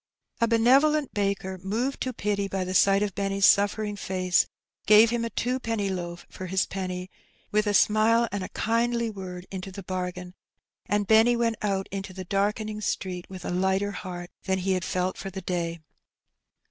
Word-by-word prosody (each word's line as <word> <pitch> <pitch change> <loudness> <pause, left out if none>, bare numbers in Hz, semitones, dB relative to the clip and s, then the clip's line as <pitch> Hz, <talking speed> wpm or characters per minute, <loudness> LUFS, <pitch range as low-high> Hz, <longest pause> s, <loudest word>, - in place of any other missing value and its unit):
A 230 - +3
benevolent 270 +6 +4
baker, 195 -2 -1
moved 225 +9 -2
to 255 - -1
pity 205 -3 -1
by 195 -1 -2
the 185 0 -4
sight 195 +2 +4
of 205 -2 -2
Benny's 195 0 +1
suffering 205 +1 +3
face, 185 -2 +1 0.4
gave 215 +2 +7
him 235 -1 0
a 230 - -2
twopenny 230 -5 -1
loaf 175 -2 -5
for 185 - -8
his 190 +1 +1
penny, 185 -1 -5 0.4
with 210 0 +2
a 205 - +2
smile 225 +3 +4
and 200 -2 -3
a - - -6
kindly 235 0 0
word 185 -3 -7
into 190 0 -6
the 195 +1 -8
bargain, 180 -1 -4 0.5
and 205 0 +1
Benny 225 +3 +5
went 230 -2 0
out 195 -2 0
into 195 -1 -5
the 185 0 -7
darkening 210 +3 -1
street 185 -3 -3
with 185 -1 -8
a - - -2
lighter 190 +2 +1
heart 180 -2 -7
than 190 0 +1
he 190 +1 -1
had 185 -2 0
felt 185 0 -1
for 195 - -5
the 190 0 -7
day. 170 -2 -2
195 Hz, 180 wpm, -26 LUFS, 185-220 Hz, 0.5 s, gave